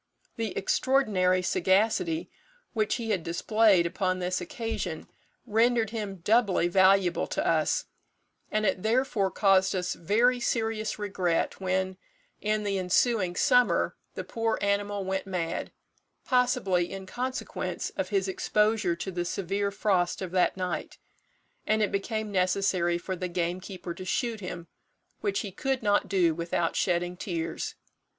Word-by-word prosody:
The 225 -4 -3
extraordinary 190 -7 +2
sagacity 180 -2 +1 0.4
which 215 -3 +1
he 225 -2 -3
had 190 -4 +1
displayed 195 +2 +3
upon 185 +1 0
this 180 0 -2
occasion 180 -3 -4 0.4
rendered 230 0 +2
him 210 -4 -4
doubly 205 -5 +3
valuable 190 -1 +4
to - - -1
us, - - +1 0.6
and 215 0 0
it 190 - +1
therefore 220 -3 +1
caused 195 -1 +3
us 180 -1 -1
very 235 +8 +2
serious 225 -2 -1
regret 190 -5 -1
when, 190 0 -1 0.4
in 215 0 0
the 200 -2 -1
ensuing 185 0 +2
summer, 250 0 +3 0.2
the - - -4
poor 225 -1 -1
animal 200 0 0
went 190 +1 -2
mad, 175 -3 -3 0.5
possibly 245 -9 +2
in 195 -1 -6
consequence 255 +6 -4
of - - -3
his 390 -1 +1
exposure 215 - +1
to 190 +3 -5
the 175 -1 -2
severe 195 +3 -1
frost 190 -3 0
of 185 -3 -5
that 185 0 +2
night, 180 -1 -3 0.7
and 215 0 +3
it 205 - 0
became 215 +1 -2
necessary 185 -2 +1
for 185 +2 -4
the 185 0 -3
gamekeeper 180 +1 -3
to 185 - -8
shoot 230 +2 -1
him, 180 -3 -6 0.5
which 400 - -1
he 205 - -6
could 265 +6 -2
not 205 -1 +2
do 180 -5 +3
without 170 0 -1
shedding 175 -1 0
tears. 165 -3 -4
195 Hz, 140 wpm, -28 LUFS, 180-220 Hz, 0.7 s, valuable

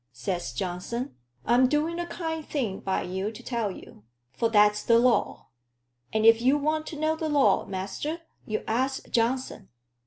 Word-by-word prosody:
Says 130 +4 -3
Johnson, 180 - -4 0.3
'I'm 245 +3 +5
doing 310 +5 0
a 345 - -3
kind 320 -3 -4
thing 240 -11 -3
by 190 - -1
you 190 +3 -3
to 220 - -12
tell 235 -4 -1
you. 180 - -11 0.3
For 230 - 0
that's 210 -1 +4
the 230 +1 +4
law.' 245 0 +1 0.6
And 220 0 +1
if 225 0 +7
you 265 +4 +4
want 310 +2 -1
to 305 - -6
know 310 +1 +1
the 320 -1 -3
law, 285 -2 +3
master, 195 - -4 0.3
you 215 0 -2
ask 260 +4 -1
Johnson. 250 +3 -1
235 Hz, 165 wpm, -27 LUFS, 210-295 Hz, 0.6 s, if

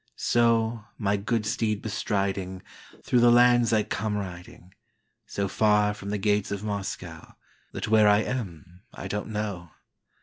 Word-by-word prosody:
So, 115 -1 +1
my 100 -2 0
good 105 +2 -1
steed 105 -1 -1
bestriding, 95 -3 -2 0.4
Through 125 - +2
the 120 0 +6
lands 120 0 +5
I 110 -2 +3
come 105 0 -2
riding, 90 -1 -9 0.5
So 100 0 -2
far 105 0 +2
from 100 -1 -8
the 105 - -1
gates 105 0 0
of 100 0 -4
MoscowThat 100 -2 -7
where 110 -1 +5
I 105 +1 +4
am 90 - -6
I - - -6
don't 105 0 -4
know. 105 -5 -4
105 Hz, 140 wpm, -26 LUFS, 100-110 Hz, 0.5 s, the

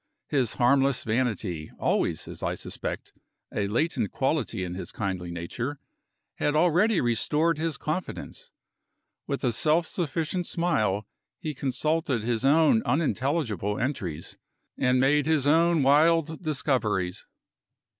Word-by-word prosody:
His 130 -6 +1
harmless 135 +1 +3
vanity, 110 -9 -1
always, - - 0
as - - -9
I - - -1
suspect, - - -6 0.4
a 100 -1 0
latent 120 - 0
quality 135 -8 -1
in 90 -1 -4
his 95 - -5
kindly 95 -4 -3
nature, 115 - -4 0.6
had 150 - 0
already 175 +5 +3
restored 150 +7 +1
his 160 -1 -1
confidence. 160 +4 -5 0.8
With 140 - -3
a 125 - +2
self 155 +8 +2
sufficient 165 +2 -2
smile 110 - 0 0.3
he 155 - -4
consulted 140 -1 0
his 115 +1 -1
own 160 - +5
unintelligible 135 - 0
entries, 100 - -3 0.4
and 125 -1 +2
made 145 +3 +3
his 155 -4 +2
own 165 +1 +4
wild 160 +3 +3
discoveries. 120 - -1
140 Hz, 120 wpm, -27 LUFS, 110-160 Hz, 0.8 s, own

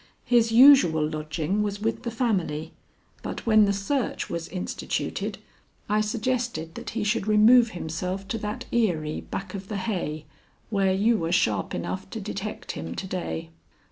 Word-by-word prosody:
His 235 -2 +3
usual 230 - +7
lodging 155 +5 -2
was 205 -1 -2
with 220 +2 -1
the 240 - -3
family, 185 - -1 0.5
but - - -6
when 215 -2 +6
the 200 - +2
search 215 +7 -2
was 170 -1 -3
instituted, 185 0 -3 0.5
I 210 +1 +2
suggested 225 -6 -2
that - - -7
he 220 - 0
should 210 0 0
remove 225 +3 +6
himself 180 +4 -4
to 225 - -2
that 210 +1 -4
eyrie 170 -10 0
back 195 - -6
of 195 -1 -6
the 210 - -3
hay 175 -7 -3 0.5
where 195 -2 +2
you 215 +4 +2
were 165 0 -2
sharp 110 - +1
enough - - -4
to - - -5
detect - - -5
him 85 +1 -6
to - - -4
day." 80 - -4
200 Hz, 160 wpm, -26 LUFS, 165-225 Hz, 0.5 s, usual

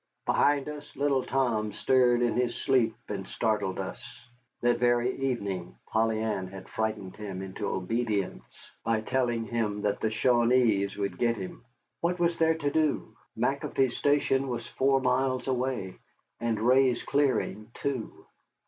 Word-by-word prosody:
Behind 145 -1 +3
us 150 -1 -8
little 140 -2 +1
Tom 115 -6 0
stirred 125 0 +3
in 120 - +2
his 125 -1 0
sleep 130 -5 +2
and - - -4
startled 105 -4 -1
us. - - -5 0.6
That 120 0 +2
very 120 +1 +2
evening 100 -10 -3
Polly 110 0 +1
Ann 105 -4 -1
had 95 0 -10
frightened 110 -4 -3
him 95 -3 -5
into 95 +2 -5
obedience 105 +1 -3
by 115 -1 +1
telling 120 -1 0
him 105 -2 -2
that 105 - 0
the 110 - 0
Shawanees 115 -3 +3
would 100 -1 -3
get 120 -1 +2
him. 95 +3 -7 0.4
What 175 +1 0
was 170 -1 +1
there 160 0 +4
to 145 -3 -1
do? 155 -1 0 0.2
McAfee's 130 -2 0
Station 140 -2 +2
was 120 -2 -3
four 135 0 +2
miles 130 0 +1
away, 125 -7 -2 0.4
and 115 -2 -1
Ray's 125 +1 +3
clearing 125 -6 0
two. 135 -5 -4
120 Hz, 145 wpm, -28 LUFS, 110-135 Hz, 0.6 s, there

